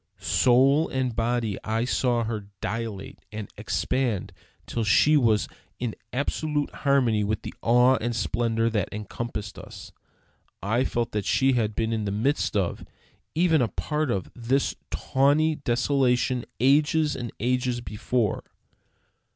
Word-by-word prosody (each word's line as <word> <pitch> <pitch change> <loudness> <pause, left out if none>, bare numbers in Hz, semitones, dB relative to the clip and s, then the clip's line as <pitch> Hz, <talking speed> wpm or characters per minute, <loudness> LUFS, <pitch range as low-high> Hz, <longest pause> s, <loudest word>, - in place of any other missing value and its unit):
Soul 135 +5 +4
and 130 -3 -1
body 115 -3 -1
I 115 +2 0
saw 125 -2 +1
her 110 -3 -4
dilate 110 -1 -5
and 110 -2 -7
expand 120 -8 -1 0.3
till 115 - -2
she 145 +9 +4
was 115 -7 +3 0.3
in 120 -3 -3 0.2
absolute 145 +2 -1
harmony 125 -7 +2
with 105 +1 -2
the - - -6
awe 125 +2 +4
and 120 +1 -1
splendor 115 +4 0
that 105 -5 -1
encompassed 105 0 -5
us. - - -11 0.7
I 115 +6 0
felt 120 -1 -1
that 105 -2 -2
she 135 0 +3
had 110 -4 0
been 115 0 0
in 110 -2 -1
the 100 - -1
midst 115 +2 0
of, 95 -4 -1 0.5
even 165 -3 +3
a 120 - +2
part 150 +4 -2
of, 100 -5 -2
this 130 +3 0
tawny 145 +3 +2
desolation 125 -1 +1
ages 150 +4 +3
and 120 -2 -5
ages 125 +1 0
before. 115 0 -1
120 Hz, 135 wpm, -26 LUFS, 110-135 Hz, 0.7 s, Soul